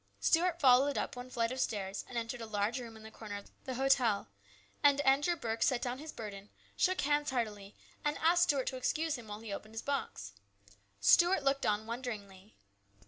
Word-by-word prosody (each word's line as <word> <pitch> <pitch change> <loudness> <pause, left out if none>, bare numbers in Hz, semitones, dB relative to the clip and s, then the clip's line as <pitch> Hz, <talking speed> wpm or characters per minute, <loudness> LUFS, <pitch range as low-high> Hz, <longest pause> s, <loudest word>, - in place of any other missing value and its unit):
Stuart 340 0 +2
followed 270 0 +5
up - - -2
one 245 +1 -8
flight 230 -1 -1
of 260 - -4
stairs, 200 -5 -2
and 245 - -5
entered 235 +1 -3
a 225 - -6
large 215 +3 -1
room 230 -2 -9
in 220 - -14
the 220 - -10
corner 210 -2 -7
of 200 - -12
the 260 - -4
hotel, 255 - +2 0.5
and 285 -1 +5
Andrew 285 +5 +3
Burke 225 -7 -4
set 255 - +3
down 250 0 -3
his 310 +1 -7
burden, 205 -4 -8 0.3
shook 370 0 +2
hands 295 +1 +1
heartily, 210 -6 -3 0.3
and 295 0 0
asked 340 +2 +3
Stuart 280 -5 +1
to 260 - -6
excuse 315 +4 0
him 240 -4 -9
while 210 +1 -7
he 220 -3 -6
opened 215 +2 -8
his 225 - -4
box. 255 - -3 0.7
Stuart 345 - +5
looked 275 0 +1
on 210 +1 0
wonderingly. 215 -5 -7
245 Hz, 195 wpm, -33 LUFS, 215-280 Hz, 0.7 s, followed